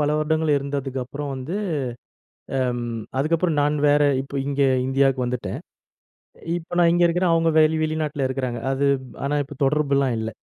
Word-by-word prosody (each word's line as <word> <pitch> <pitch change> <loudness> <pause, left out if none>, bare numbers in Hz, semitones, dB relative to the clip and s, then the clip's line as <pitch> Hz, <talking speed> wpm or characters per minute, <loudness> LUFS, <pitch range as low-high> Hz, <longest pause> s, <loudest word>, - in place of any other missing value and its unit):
பல 145 - +2
வருடங்கள் 155 0 +1
இருந்ததுக்கப்புறம் 140 0 -4
வந்து. 135 +8 -4 1.0
அ, - - +1 0.6
அதுக்கப்புறம் 165 +2 +1
நான் 145 +1 +1
வேற 145 +1 +4 0.2
இப்ப 135 0 -4
இங்க 140 0 -1 0.3
இந்தியாவுக்கு 135 -1 +2
வந்துட்டேன். 120 -2 -3 1.0
இப்ப 175 +1 -7
நான் 170 -1 +5
இங்கே 175 0 +4
இருக்கிறேன். 175 0 +2
அவுங்க 165 0 +3
வெளி 155 +1 +3
வெளிநாட்ல 155 -3 -1
இருக்கிறாங்க. 130 -3 -3
அது, 140 +1 +1 0.4
ஆனா 145 +1 0
இப்ப 145 - -10
தொடர்புலாம் 140 -3 +1
இல்ல. 110 0 -3
145 Hz, 145 wpm, -23 LUFS, 135-155 Hz, 1.0 s, நான்